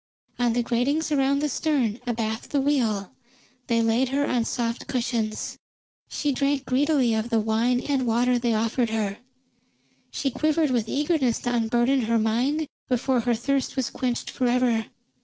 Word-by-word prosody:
On 240 -1 +2
the 240 0 +1
gratings 275 +7 0
around 280 0 +2
the - - +2
stern, 265 -6 0
abaft 220 -1 -2
the 285 - +1
wheel, 235 -9 0 0.6
they 230 -1 +2
laid 230 +3 +2
her 280 +2 +1
on 245 -5 0
soft 235 -1 -2
cushions. 230 -4 -2 0.5
She 295 - -1
drank 275 +1 0
greedily 265 -2 +2
of 220 +1 -1
the 230 - +2
wine 225 +3 +1
and 270 -3 -1
water 245 +2 +2
they 235 -2 +1
offered 230 +2 0
her; 210 -2 -2 0.9
she 275 - -2
quivered 310 +2 +1
with 230 -3 0
eagerness 290 -5 +1
to 245 - -1
unburden 240 +3 +2
her 230 +1 +2
mind 250 +8 0 0.2
before 255 0 +1
her 235 +1 +1
thirst 270 +4 -1
was 265 -3 -1
quenched 245 -2 -2
forever. 245 -3 +1
245 Hz, 160 wpm, -25 LUFS, 230-275 Hz, 0.9 s, On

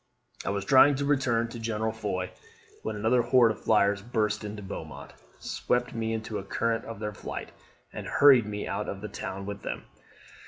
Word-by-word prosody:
I - - -2
was 100 -1 -2
trying 140 +3 +7
to 140 +1 -1
return 130 -5 +2
to 115 - -7
General 110 -1 -1
Foy, 100 -4 -3 0.5
when 110 - -3
another 110 +4 +3
horde 120 -1 +5
of 110 - -8
flyers 100 -2 +3
burst 110 -1 -1
into 105 0 -6
Beaumont, 95 - -8 0.2
swept 125 0 -1
me 115 -1 -2
into 110 0 -4
the - - -3
current 115 +3 -1
of 115 - -7
their 105 -1 -3
flight, - - -6 0.4
and - - -6
hurried 135 -6 +6
me 105 0 -4
out 100 +2 -2
of 95 - -5
the 105 - -4
town 95 +1 -5
with 100 0 -6
them. - - -5
110 Hz, 190 wpm, -28 LUFS, 105-115 Hz, 0.5 s, trying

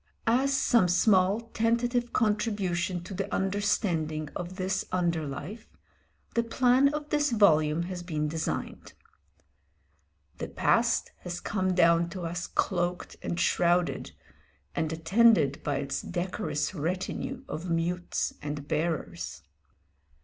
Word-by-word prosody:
As 255 +4 +3
some 230 -9 +4
small, 190 +2 +4
tentative 240 +2 +1
contribution 200 -5 0
to 190 - -8
the 195 +2 -3
understanding 180 -6 0
of 180 +1 -5
this 190 0 -1
under 170 -4 0
life, 190 +11 -7 0.7
the 235 - +3
plan 250 +4 +3
of 300 0 -5
this 295 0 +2
volume 165 -8 +4
has 180 0 -5
been 155 -4 -2
designed. 160 +1 -4 1.5
The - - -3
past - - +1
has 175 0 -5
come 185 -2 -1
down 170 -1 +4
to 180 - -5
us 175 +1 -3
cloaked 175 -1 -1
and 170 - -3
shrouded, 175 -4 +1 0.6
and 160 -1 -1
attended 165 - +3
by 145 - -1
its 140 0 -2
decorous 180 -2 -2
retinue 185 - -3
of 170 +3 -5
mutes 170 +1 -1
and 145 0 -5
bearers. 150 - -3
180 Hz, 120 wpm, -28 LUFS, 165-210 Hz, 1.5 s, some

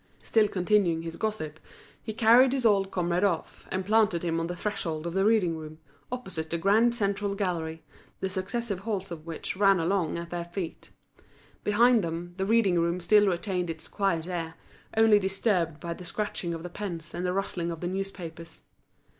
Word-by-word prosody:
Still 220 -2 +3
continuing 180 -4 +2
his 165 0 -6
gossip, 170 -9 -3 0.4
he - - -5
carried 235 +4 +6
his 260 -3 -1
old 195 -3 +4
comrade 175 0 0
off, 180 -5 -1
and 190 0 -2
planted 210 -5 +3
him 165 -1 0
on 165 - -1
the 175 - -4
threshold 175 -5 -3
of 170 - -3
the 195 +1 +2
reading 205 -6 +3
room, 155 -1 -8 0.3
opposite 190 -11 -4
the 170 - -1
grand 220 +7 +3
central 200 -2 0
gallery, 165 -5 -2 0.4
the 190 - -1
successive 200 +2 -3
halls 195 -2 -3
of 160 -1 -8
which 165 +2 -4
ran 195 -1 +4
along 170 -1 0
at 170 0 -6
their 175 -1 -3
feet. 175 -1 -6 0.7
Behind 230 +1 +4
them, 170 +1 -4
the 190 0 -1
reading 205 -6 +3
room 170 +1 +1
still 205 +3 +5
retained 180 -1 -1
its 160 -1 -5
quiet 180 -5 0
air, 165 -2 -4 0.4
only 220 -2 +6
disturbed 190 -5 0
by 170 0 -4
the 180 - -10
scratching 180 -2 -3
of 165 - -7
the 175 - -5
pens 170 -5 -5
and 175 - -3
the 180 - 0
rustling 180 -3 -2
of 165 -1 -5
the 175 - -3
newspapers. 175 -3 -6
185 Hz, 185 wpm, -28 LUFS, 170-205 Hz, 0.7 s, carried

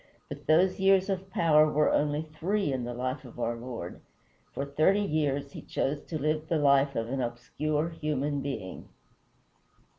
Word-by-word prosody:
But - - -9
those 175 +5 +4
years 190 0 +4
of 190 0 -3
power 155 -4 +4
were 150 0 +3
only 150 +1 +1
three 160 +2 -1
in 125 -2 -2
the 120 - -4
life 130 +4 -3
of 120 -2 -12
our 120 0 -1
Lord; 115 -7 -7 0.5
for 140 - -3
thirty 155 +8 +3
years 145 -5 -1
he - - -8
chose 145 +2 -2
to 160 - -4
live 155 +1 -1
the 165 - +1
life 140 -1 +3
of 115 0 -1
an 135 +1 -1
obscure 150 +6 -2
human 150 -3 -2
being. 110 -10 -6
150 Hz, 170 wpm, -29 LUFS, 135-155 Hz, 0.5 s, those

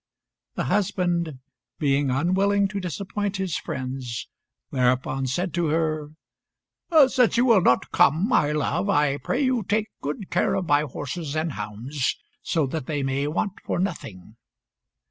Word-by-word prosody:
The - - -1
husband, 175 -3 0 0.4
being 140 -1 +1
unwilling 190 +8 +2
to 200 0 -3
disappoint 195 +3 -3
his 190 -5 -2
friends, 130 -2 -4 0.4
thereupon 130 +1 +1
said 175 +8 -2
to 175 -1 +1
her 155 -1 0 1.0
"Since 250 -3 +2
you 245 - +4
will 230 -6 +5
not 125 - +2
come, 160 +8 +4
my 150 - +3
love, 150 +6 0
I 145 -6 +2
pray 250 - -2
you 255 -3 +2
take 215 +2 0
good 150 +7 -5
care - - +2
of 190 - -1
my 145 -2 +4
horses 150 +2 -5
and 155 +1 0
hounds, 120 +6 -3 0.2
so 160 -3 0
that 135 0 -4
they 145 -3 -1
may 135 +2 0
want 190 +6 -2
for - - -2
nothing." 115 - -4
155 Hz, 145 wpm, -24 LUFS, 135-190 Hz, 1.0 s, will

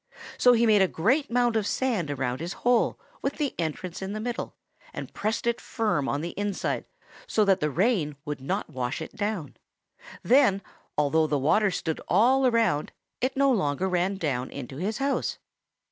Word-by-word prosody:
So 245 - +7
he 235 0 +3
made 215 -3 +5
a 190 - +5
great 260 - +1
mound 240 -1 +2
of 215 -2 +1
sand 220 - 0
around 130 -3 -2
his 170 +2 -4
hole 245 -1 +3 0.2
with 275 - -1
the 290 -3 -2
entrance 170 +3 -3
in 190 +1 -4
the 215 - -3
middle 240 +2 -4 0.4
and - - -6
pressed 220 +3 -2
it 235 0 0
firm 210 - -1
on 145 - -1
the 170 +2 -4
inside 205 -1 -2 0.4
so 215 - +2
that 195 -1 +3
the 150 - 0
rain 170 - +1
would 150 -3 -4
not 140 +3 -3
wash 125 -3 -3
it 160 - -8
down 205 -5 -2 0.7
in. - - -13
Then, 240 -6 +4 0.4
although 155 +2 +3
the 150 -1 +1
water 180 +10 +3
stood 165 -3 -3
all 255 +7 +4
around, 230 -11 +1 0.3
it 260 +1 -1
no 275 0 +4
longer 185 - +1
ran 185 +1 +1
down 135 -8 -2
in 135 -3 -7
his 185 +11 -3
house. 275 0 -1
195 Hz, 185 wpm, -27 LUFS, 150-235 Hz, 0.7 s, So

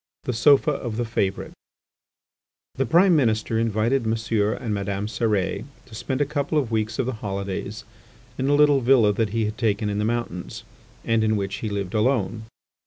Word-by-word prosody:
THE 125 - -2
SOFA 140 +5 +4
OF 120 -6 -4
THE 120 - -1
FAVOURITE 100 -4 -2 1.2
The 135 -1 -1
Prime 175 - +5
Minister 110 -5 +1
invited 115 +3 +1
Monsieur 110 -1 0
and 115 -4 -4
Madame 100 0 -2
Cérès 105 -2 -1 0.2
to 125 - -17
spend 130 +5 -3
a - - +3
couple 145 +1 -2
of 130 -6 0
weeks 110 0 -1
of 130 - 0
the 130 - -2
holidays 100 -3 -5 0.5
in 130 - -2
a 145 - +4
little 145 -2 +4
villa 120 -4 +4
that 110 +1 0
he 110 +1 0
had 105 +2 -5
taken 105 -2 0
in 100 - -2
the - - 0
mountains, 115 -6 -3 0.4
and 115 -1 +2
in 110 0 +2
which 100 -1 -3
he 110 +1 -4
lived 100 -1 -4
alone. 110 -1 0
110 Hz, 180 wpm, -24 LUFS, 105-125 Hz, 1.2 s, Prime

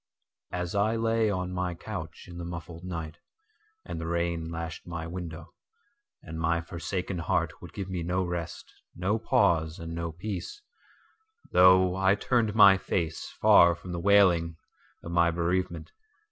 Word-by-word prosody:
As 90 -1 -3
I 105 +2 +2
lay 115 -1 +1
on 90 -2 -2
my 90 -1 -2
couch - - -7
in 85 -1 -9
the - - -5
muffled 85 0 -7
night, 85 -3 -6 0.7
and - - -5
the 80 - -4
rain 85 -1 -1
lashed 85 0 -6
my 85 -1 -5
window, 85 0 -7 0.7
And 80 -2 -7
my 85 +1 +1
forsaken 90 +2 -4
heart 85 -1 -1
would 90 - -10
give 100 -2 -5
me 90 -2 -3
no 90 +2 0
rest, 85 -1 -5 0.2
no 100 +5 0
pause 85 -11 +2
and 85 0 -7
no 85 0 -3
peace, 100 - -6 0.9
Though 90 0 +6
I 95 +1 +3
turned 110 -1 0
my 100 -3 +8
face 85 -3 -2
far 85 0 +7
from 90 +2 -10
the 85 - -3
wailing 90 -4 +4 0.5
of 85 - -7
my 85 0 +4
bereavement. 85 +2 -2
85 Hz, 155 wpm, -28 LUFS, 85-95 Hz, 0.9 s, my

